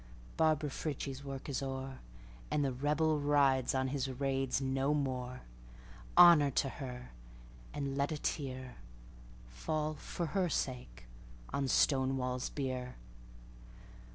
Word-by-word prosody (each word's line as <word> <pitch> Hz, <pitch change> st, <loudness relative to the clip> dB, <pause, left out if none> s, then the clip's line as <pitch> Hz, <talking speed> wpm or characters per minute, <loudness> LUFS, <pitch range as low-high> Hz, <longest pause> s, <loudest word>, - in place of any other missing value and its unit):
Barbara 155 Hz, -2 st, +2 dB
Frietchie's 140 Hz, -2 st, -4 dB
work 135 Hz, -1 st, -6 dB
is 140 Hz, -1 st, -2 dB
o'er, 135 Hz, 0 st, -4 dB, 0.5 s
And 145 Hz, -1 st, +1 dB
the 135 Hz, -, 0 dB
Rebel 150 Hz, +4 st, +1 dB
rides 140 Hz, -3 st, +3 dB
on 130 Hz, 0 st, +1 dB
his 135 Hz, -1 st, -1 dB
raids 135 Hz, 0 st, 0 dB
no 135 Hz, +2 st, +1 dB
more. 130 Hz, -3 st, -2 dB, 0.8 s
Honor 170 Hz, -5 st, +9 dB
to 135 Hz, +1 st, 0 dB
her! 125 Hz, -2 st, -7 dB, 0.6 s
and 140 Hz, -1 st, -3 dB
let 140 Hz, +2 st, 0 dB
a -, -, -1 dB
tearFall, 60 Hz, -, -5 dB
for 170 Hz, -, -4 dB
her 180 Hz, +2 st, 0 dB
sake, 125 Hz, -, -3 dB, 0.5 s
on 140 Hz, -1 st, 0 dB
Stonewall's 130 Hz, -2 st, +1 dB
bier. 130 Hz, -3 st, -4 dB
135 Hz, 115 wpm, -34 LUFS, 130-145 Hz, 0.8 s, Honor